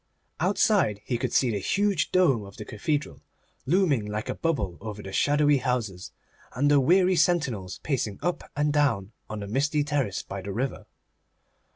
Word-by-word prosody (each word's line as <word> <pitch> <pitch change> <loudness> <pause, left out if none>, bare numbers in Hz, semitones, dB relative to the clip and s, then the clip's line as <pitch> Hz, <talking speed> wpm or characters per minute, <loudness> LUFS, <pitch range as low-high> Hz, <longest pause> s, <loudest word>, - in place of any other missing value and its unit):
Outside 185 - +2
he 120 -2 -1
could 130 -2 -2
see 125 -3 +3
the 105 - -1
huge 200 - 0
dome 150 - +3
of 100 -1 -12
the 105 - -7
cathedral, 145 +8 -3 0.5
looming 160 - +2
like 105 +1 -4
a - - 0
bubble 145 - -2
over 105 -1 -7
the 95 - -7
shadowy 145 +4 +3
houses, 120 -8 -2 0.4
and 145 +4 +2
the 145 - +6
weary 180 +6 +4
sentinels 140 - 0
pacing 115 -9 -1
up 175 -1 -2
and 150 0 +1
down 115 -10 +1 0.2
on 110 -1 -5
the 100 - -5
misty 145 +7 +1
terrace 140 -9 -1
by 100 0 -6
the 100 +1 -6
river. 125 +6 -3
135 Hz, 170 wpm, -26 LUFS, 105-155 Hz, 0.5 s, the